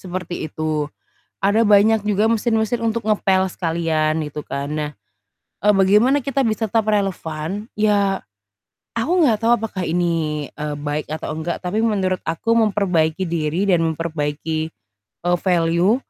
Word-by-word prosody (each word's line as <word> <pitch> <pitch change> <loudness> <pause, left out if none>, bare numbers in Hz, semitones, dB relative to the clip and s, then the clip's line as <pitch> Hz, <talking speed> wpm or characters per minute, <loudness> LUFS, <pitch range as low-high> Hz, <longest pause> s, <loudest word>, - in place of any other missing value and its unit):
Seperti 180 -3 -5
itu. 155 -1 -2 0.5
Ada 210 +3 +3
banyak 210 +1 +5
juga 210 +1 +2
mesin-mesin 230 0 0
untuk 230 0 0
ngepel 190 -3 +2
sekalian 160 -3 0
gitu 150 +1 -7
kan. 140 0 -4
Nah, 150 -1 -2 0.7
eee, 210 - +6
bagaimana 210 +9 +4
kita 275 +1 0
bisa 220 -1 0
tetap 225 +2 +1
relevan? 195 -3 -2
Ya, 205 -2 +2 0.7
aku 230 +8 -1
enggak 235 -7 +4
tahu 230 - +4
apakah 205 -4 -4
ini, 160 -3 -1
eee, 150 0 -4
baik 145 +1 -3
atau 155 0 -4
enggak, 160 +2 -3
tapi 200 +5 -1
menurut 190 -5 +1
aku 165 +8 0
memperbaiki 190 -5 +1
diri 165 +3 -1
dan 175 -3 +3
memperbaiki, 160 0 -2 0.5
eee, 175 0 +3
value 175 +3 +3
185 Hz, 140 wpm, -21 LUFS, 160-215 Hz, 0.7 s, eee